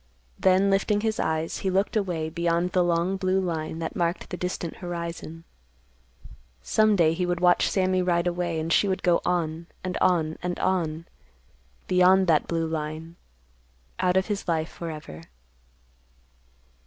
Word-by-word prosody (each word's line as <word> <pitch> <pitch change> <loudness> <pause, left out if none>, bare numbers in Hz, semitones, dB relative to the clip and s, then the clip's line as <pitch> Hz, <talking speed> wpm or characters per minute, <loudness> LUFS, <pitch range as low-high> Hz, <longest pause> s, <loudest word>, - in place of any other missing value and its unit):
Then, 190 +1 +4
lifting 205 +1 +1
his 220 0 -1
eyes, 160 0 -1
he 190 - -1
looked 195 +4 0
away 175 -7 -1
beyond 170 +1 0
the 180 -1 +3
long 175 +2 +1
blue 190 0 +1
line 160 -4 -3
that 165 0 -4
marked 170 0 -2
the - - -2
distant 180 -2 -4
horizon. 170 -2 -6 1.2
Some 215 -1 +3
day 165 -4 +3
he 180 +2 -2
would 175 -1 -1
watch 180 0 +4
Sammy 185 -1 +1
ride 175 -1 +1
away 175 -2 -1
and 160 +1 -1
she 205 - +3
would 190 -1 -2
go 175 -1 +3
on, 165 -2 -1 0.2
and 185 -1 -3
on, 160 -4 +2
and 180 0 -3
on, 165 -3 -1 0.8
beyond 185 +1 +5
that 160 -4 +2
blue 165 -1 -1
line, 160 +1 -5 0.8
put 180 0 +2
of 190 - +2
his 205 -2 -4
life 160 -1 0
forever. 155 - -8
175 Hz, 155 wpm, -26 LUFS, 165-185 Hz, 1.2 s, beyond